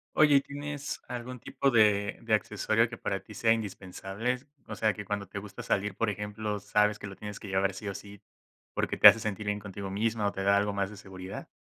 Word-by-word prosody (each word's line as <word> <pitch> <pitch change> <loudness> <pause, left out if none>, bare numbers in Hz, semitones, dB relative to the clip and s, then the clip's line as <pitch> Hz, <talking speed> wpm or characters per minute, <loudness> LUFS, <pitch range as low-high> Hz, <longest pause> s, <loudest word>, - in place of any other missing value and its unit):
Oye, 150 -2 +6
¿y 135 - +6
tienes 145 0 -5
algún 125 +1 -6
tipo 135 +3 0
de 105 -3 +3
de 110 -2 +3
accesorio 110 +2 +1
que 115 0 -9
para 95 -1 -2
ti 110 - -12
sea 115 +2 +2
indispensable, 105 +2 -2 0.3
o - - -5
sea, 110 -2 +2
que 105 -1 -7
cuando 100 -1 -2
te 100 +2 -5
gusta 100 0 -9
salir, 100 0 0
por 115 0 +1
ejemplo, 105 0 -4
sabes 105 +1 +2
que - - -6
lo 100 - -8
tienes 105 0 -7
que 105 - -9
llevar, 95 0 +1
sí, 100 +2 -7
o 100 - -3
sí, 100 0 -10 0.5
porque - - 0
te - - +10
hace - - +9
sentir 105 -1 -3
bien 105 - +1
contigo 100 -1 -6
misma,o 105 +1 0
te 95 - -4
da 100 0 +5
algo 105 +1 +2
más 100 0 -1
de 105 - -10
seguridad? 95 -1 -8
105 Hz, 225 wpm, -29 LUFS, 100-115 Hz, 0.5 s, te